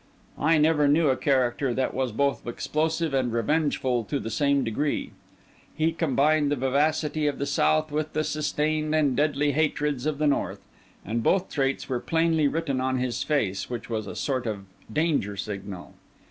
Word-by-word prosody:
I 160 +2 +3
never 150 -1 +3
knew 150 +1 +4
a 130 - +3
character 130 -2 +1
that 130 - 0
was 130 -2 -1
both 140 +4 -1
explosive 160 +5 -1
and 130 -3 +1
revengeful 125 -1 0
to 140 +6 -2
the 115 - -5
same 140 +3 +2
degree; 135 +6 -2 0.6
he 160 +2 +1
combined 155 -2 +2
the - - +2
vivacity 150 +3 +1
of 145 - -1
the 140 - -2
south 155 +2 +1
with 155 +1 -2
the 155 - 0
sustained 155 +1 -1
and 145 -4 +2
deadly 145 +1 +1
hatreds 150 -2 0
of 155 -2 -1
the 155 - 0
north; 145 - 0 0.4
and 115 +4 -1
both 190 - +1
traits 135 -2 -1
were 125 -3 -1
plainly 160 0 +2
written 140 -4 -1
on 130 0 0
his 125 -1 -2
face, 100 -11 -1
which 120 -1 -6
was 110 -2 -2
a - - -6
sort 130 -4 -2
of 100 -3 -4 0.3
danger 140 -9 0
signal. 100 -3 -6
140 Hz, 175 wpm, -26 LUFS, 125-155 Hz, 0.6 s, knew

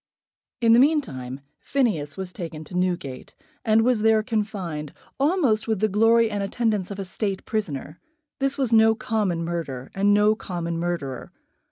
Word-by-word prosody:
In 230 -1 +5
the 235 - +7
meantime 140 - +1 0.2
Phineas 195 - 0
was 190 -1 -5
taken 165 -4 -6
to 170 +4 -10
Newgate, 175 -8 -2 0.3
and 225 -1 +4
was 245 -2 +2
there 220 0 +4
confined, 200 - -3 0.3
almost 275 - +2
with 220 -3 0
the 215 - +3
glory 225 +2 +4
and 205 -1 -2
attendance 210 -2 -1
of 200 - -6
a 195 - -4
State 195 +1 -3
prisoner. 160 - -4 0.4
This 275 +1 0
was 260 -4 0
no 220 0 +6
common 200 -7 -1
murder, 150 -7 -4
and 200 +1 +2
no 210 +1 +5
common 170 -5 -4
murderer. 165 -7 -3
205 Hz, 160 wpm, -24 LUFS, 170-225 Hz, 0.4 s, the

